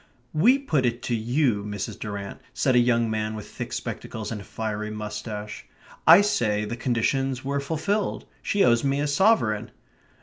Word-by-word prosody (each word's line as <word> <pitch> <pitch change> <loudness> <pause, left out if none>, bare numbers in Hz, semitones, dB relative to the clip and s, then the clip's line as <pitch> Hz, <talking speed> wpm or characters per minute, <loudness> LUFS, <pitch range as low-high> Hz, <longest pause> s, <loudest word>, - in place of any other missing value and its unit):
"We 220 - +5
put 160 - 0
it 120 +1 -3
to 125 -2 0
you, 120 -1 +1
Mrs. 105 -1 -5
Durrant," 100 -2 -6
said 130 - +2
a - - +7
young 120 -1 +3
man 110 0 -2
with 105 - -7
thick - - -7
spectacles 110 -1 -5
and 105 -3 -4
a - - -10
fiery 105 -1 -4
moustache. 105 0 -6 0.4
"I 170 +5 +10
say 105 - +1
the 115 - -4
conditions 130 +2 0
were 140 +1 0
fulfilled. 165 +8 -1 0.2
She 200 - +2
owes 120 -1 +4
me 140 0 +1
a 145 - +1
sovereign." 140 - +2
120 Hz, 170 wpm, -25 LUFS, 105-140 Hz, 0.4 s, I